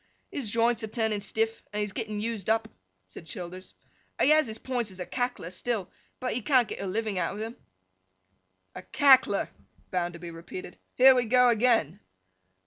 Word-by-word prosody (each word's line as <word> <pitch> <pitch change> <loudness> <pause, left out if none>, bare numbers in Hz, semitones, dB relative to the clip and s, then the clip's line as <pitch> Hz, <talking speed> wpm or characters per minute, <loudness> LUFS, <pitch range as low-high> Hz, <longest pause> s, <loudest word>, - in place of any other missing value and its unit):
'His 265 -7 -2
joints 230 +1 +2
are - - -2
turning 220 -2 0
stiff, 225 +2 -1
and 205 - -5
he 210 - +1
is 205 -2 -4
getting 215 -2 -4
used 220 -2 -3
up,' 225 0 +2 0.4
said 125 - -12
Childers. 180 +3 -8 0.4
'He 290 - +4
has 310 -3 +5
his 220 0 -5
points 245 -4 -2
as 190 -1 -9
a 180 - -4
Cackler 245 -8 -3
still, 205 0 -3 0.3
but 255 0 -2
he 245 - -2
can't 250 0 +3
get - - -6
a 195 - -3
living 210 0 -2
out 170 - -1
of 205 - -7
them.' 225 +2 -5 1.2
'A - - -8
Cackler!' 260 -8 +5 0.4
Bounderby 175 -1 -3
repeated. 170 +2 -9 0.2
'Here 265 +1 +8
we 250 -2 +1
go 250 +2 +5
again! 225 - +2
220 Hz, 180 wpm, -28 LUFS, 185-245 Hz, 1.2 s, Here